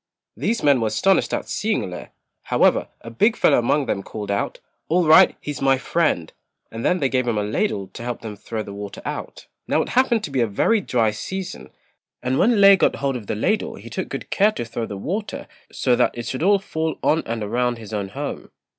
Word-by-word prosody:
These 230 0 -1
men 140 -4 +4
were 110 - +1
astonished 180 - +2
at - - -2
seeing 215 0 -1
Lê; 90 -1 -7 0.4
however, - - +3
a 115 - -9
big 215 - +2
fellow - - +4
among 135 +4 +1
them 100 - -1
called 105 0 -6
out, 100 - -2 0.3
"All 175 +1 +3
right, 155 0 +6
he's 150 -1 -6
my 135 -1 +4
friend," 130 - 0 0.4
and 115 +1 -6
then 180 - +2
they 140 - +1
gave 130 -1 0
him 115 -3 0
a 105 - 0
ladle 105 - -1
to 100 - -10
help 120 0 -4
them 110 -2 -6
throw 110 +1 -5
the 100 - -9
water 100 0 -8
out. - - -6 0.2
Now - - +2
it - - -9
happened 245 -3 +2
to 145 - -5
be 135 -2 +1
a 115 - +2
very 205 - +2
dry 115 - +1
season, 185 - -6 0.5
and 130 +2 0
when 235 +5 +4
Lê 200 -2 +7
got - - +3
hold 135 -1 -1
of 110 -5 -7
the - - -2
ladle 210 - 0
he - - -11
took - - -4
good - - -6
care 205 +2 +4
to 120 - -4
throw 115 0 -4
the 100 - -6
water 200 - -4 0.2
so 125 -2 +1
that 120 0 +1
it 120 - -4
should 130 - -4
all 200 +4 +5
fall 160 -4 -3
on 160 +1 +3
and 115 -1 -3
around 120 +3 0
his 110 -1 -10
own 100 -2 -2
home. - - -6
125 Hz, 225 wpm, -22 LUFS, 110-180 Hz, 0.5 s, Lê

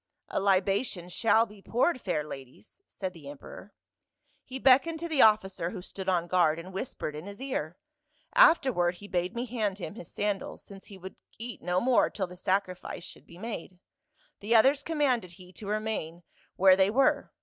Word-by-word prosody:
'A - - -1
libation 195 -1 +1
shall 225 +4 +3
be 210 -2 -15
poured, 255 - +1
fair 165 -6 -1
ladies,' 135 - -11
said 185 -2 -5
the 150 -5 -11
emperor. 145 +7 -11 0.7
He 260 - -7
beckoned 275 +5 +4
to 340 - -4
the 315 -5 +2
officer 195 -5 +3
who 180 -1 -7
stood 190 0 -5
on 175 -2 +1
guard, 175 -3 +2
and 180 +3 -9
whispered 190 - -4
in 155 +5 -8
his 200 +2 -9
ear, 185 - -4 0.6
afterward 260 - +5
he 205 +3 -12
bade 180 0 -2
me 240 +1 -2
hand 215 -5 -2
him 180 -4 -6
his 190 -6 -10
sandals, 205 -1 -3
since 195 -1 -13
he 200 - -12
would 190 +1 -10 0.2
eat 230 -2 -7
no 180 +1 0
more 250 +4 +3
till 195 - -3
the 180 0 -11
sacrifice 185 -1 -2
should - - -11
be 170 - -14
made; 190 -4 -7 0.6
the 220 +3 +1
others 270 +6 +5
commanded 270 - 0
he 185 0 -15
to 205 - -9
remain 210 -6 -3 0.3
where 190 0 +6
they 190 +1 +3
were. 260 +5 +2
195 Hz, 185 wpm, -29 LUFS, 180-230 Hz, 0.7 s, where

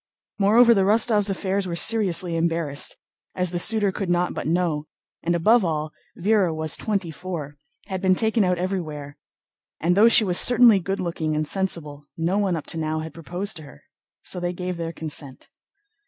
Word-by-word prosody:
Moreover, 230 +4 +5
the 195 - +2
Rostóvs' 210 +1 +2
affairs 195 0 -2
were 170 - -4
seriously 180 -4 +2
embarrassed, 165 -3 -1 0.4
as 180 -2 -1
the 175 - -1
suitor 205 +1 +3
could 195 -1 -4
not 175 0 0
but - - -5
know; 160 -3 -1 0.3
and 170 +1 0
above 215 +7 +3
all, 155 -2 -3 0.3
Véra 190 -3 +1
was 155 -1 0
twenty 200 -6 -3
four, 160 -4 -7 0.3
had 190 -2 -5
been 185 -1 +3
taken 220 +1 +1
out 180 -1 +1
everywhere, 155 -6 -4 0.6
and 175 +2 +1
though 210 +4 +6
she 225 - +6
was 180 -3 +3
certainly 240 -4 +6
good 195 +2 -4
looking 165 -3 -3
and 155 0 -2
sensible, 150 -7 -3
no 170 +5 0
one 195 -4 0
up 155 - -6
to 165 - -5
now 155 0 -2
had 160 -1 -8
proposed 180 +4 -5
to 155 - -9
her. 70 - -16 0.4
So 180 - -3
they 175 0 -3
gave 180 0 -5
their 165 -1 -4
consent. 150 -5 -8
180 Hz, 185 wpm, -23 LUFS, 160-195 Hz, 0.6 s, though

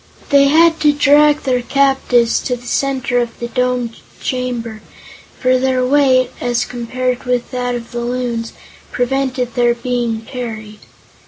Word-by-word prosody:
They 280 0 +5
had 325 +3 +4
to 300 -1 +4
drag 290 +1 +4
their 255 -2 0
captives 265 -2 +2
to 250 - -2
the 245 0 -13
center 260 -1 0
of 235 -1 -4
the 235 - -4
domed 250 -2 -1 0.2
chamber, 240 -4 -4 0.6
for 255 0 +2
their 255 -1 +1
weight, 260 -2 +3
as 245 0 0
compared 250 +1 -3
with 250 -1 -1
that 245 -1 -2
of 235 -1 -7
the 240 - -4
Loons, 240 -1 -3 0.4
prevented 255 -1 -1
their 240 0 +2
being 240 -2 -2
carried. 220 -3 -7
250 Hz, 145 wpm, -17 LUFS, 240-265 Hz, 0.6 s, They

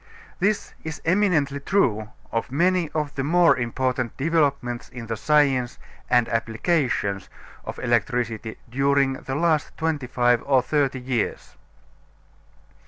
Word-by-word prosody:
This 200 +3 0
is 160 0 -5
eminently 165 -7 +2
true 120 - +1 0.2
of 115 +2 -2
many 175 +3 +2
of 150 -2 -1
the 135 - -2
more 170 +4 +4
important 125 0 -2
developments 140 -5 0
in 120 -2 -8
the 115 0 -3
science 135 -2 +2 0.3
and 120 -2 +4
applications 115 - -1 0.3
of - - -7
electricity 115 -2 -1
during 135 +2 +2
the 130 0 -5
last 160 -1 0
twenty 160 -5 -1
five 120 -1 +2
or 135 -3 +4
thirty 140 -1 0
years. 125 -3 -3
135 Hz, 120 wpm, -24 LUFS, 120-155 Hz, 0.3 s, more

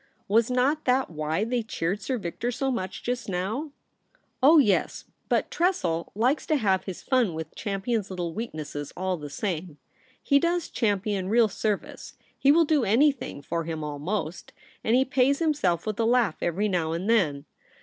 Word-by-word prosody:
Was 225 +3 +3
not 265 +5 +1
that 255 -4 +2
why 155 +4 -1
they 240 +2 0
cheered 205 -2 -2
Sir 255 +5 -2
Victor 210 +4 -3
so 270 +2 -1
much 190 -6 -4
just 245 -2 -3
now 210 - -2 0.3
?* - - -39
' - - -45
Oh 300 +5 +7
yes; 210 -10 +2 0.2
but - - +1
Tressel 185 - 0
likes 250 +8 +1
to 310 - +2
have 190 -8 +1
his 190 -3 -7
fun 245 -10 +1
with 160 -1 -6
Champion's 205 +1 -2
little 175 -3 -4
weaknesses 155 -9 -5
all 185 0 -1
the 150 -2 -8
same. 170 -2 -4 0.5
He 280 - +4
does 340 +1 0
Champion 200 -3 0
real 230 +1 +5
service; 210 0 -3 0.2
he 280 - +4
will 330 +2 +5
do 300 -3 +2
anything 245 - +1
for 165 +2 -2
him 160 -1 -4
almost, 155 +4 -4 0.3
and 225 - +3
he 260 +1 +4
pays 270 +1 +2
himself 280 - +1
with 215 -1 -3
a 225 - +2
laugh 235 -7 +2
every 185 +5 0
now 170 -5 0
and 175 +4 -3
then. 155 -11 +2
210 Hz, 180 wpm, -26 LUFS, 175-255 Hz, 0.5 s, Oh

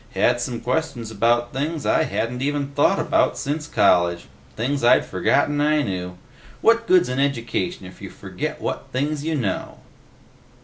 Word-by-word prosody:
Had 120 0 +2
some 120 -2 -4
questions 125 -2 -2
about 120 +3 +1
things 150 +4 -3
I - - +2
hadn't 125 +2 -3
even 145 0 -1
thought 145 +1 +2
about - - +1
since 150 +2 -3
college, 85 -3 +2 0.3
things 130 +4 -2
I'd 120 - +5
forgotten 145 0 +1
I 150 0 +2
knew. 90 -4 -4 0.4
What 230 0 +3
good's 180 -1 +5
an 125 +1 -2
education 140 - -1
if 90 0 -13
you - - -7
forget - - -6
what - - -4
things 145 +3 -2
you 160 0 -1
know?" 110 -10 -3
130 Hz, 160 wpm, -22 LUFS, 115-145 Hz, 0.4 s, I'd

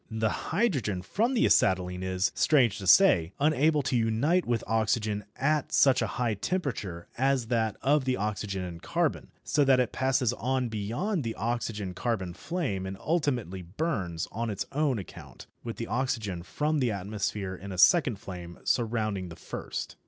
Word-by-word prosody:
The 110 -1 -2
hydrogen 140 - 0
from 225 - 0
the 230 - +3
acetylene 90 -1 +2
is, 95 0 0
strange 120 -9 +3
to 95 - -6
say, 90 - +6
unable 150 0 +3
to 135 -1 -1
unite 120 +10 +2
with 120 -2 0
oxygen 110 -1 0
at 150 +1 0
such 135 -3 +4
a 110 - +1
high 120 -3 +1
temperature 105 - -3
as 130 -3 +1
that 110 -3 0
of 140 +1 +3
the 130 -1 +1
oxygen 100 -2 -3
and 85 -2 -7
carbon, - - -1 0.2
so 145 - +2
that 135 -2 +4
it 125 -3 +1
passes 130 -2 +1
on 130 0 -1
beyond 120 - -2
the 115 -1 -3
oxygen 110 -4 -3
carbon 95 -4 -2
flame 135 - -3
and 95 0 -6
ultimately 125 - -1
burns 90 - -3
on 115 +2 -3
its 100 -1 -3
own 145 -3 +1
account 100 - -10 0.2
with 115 -1 -5
the 115 - -4
oxygen 115 -9 -2
from 150 - -1
the 125 -3 +2
atmosphere 100 -1 -3
in 95 +2 -8
a 95 - -6
second 145 - +5
flame 90 -3 -9
surrounding 110 -6 0
the 80 - -9
first. - - -6
115 Hz, 165 wpm, -28 LUFS, 95-135 Hz, 0.2 s, say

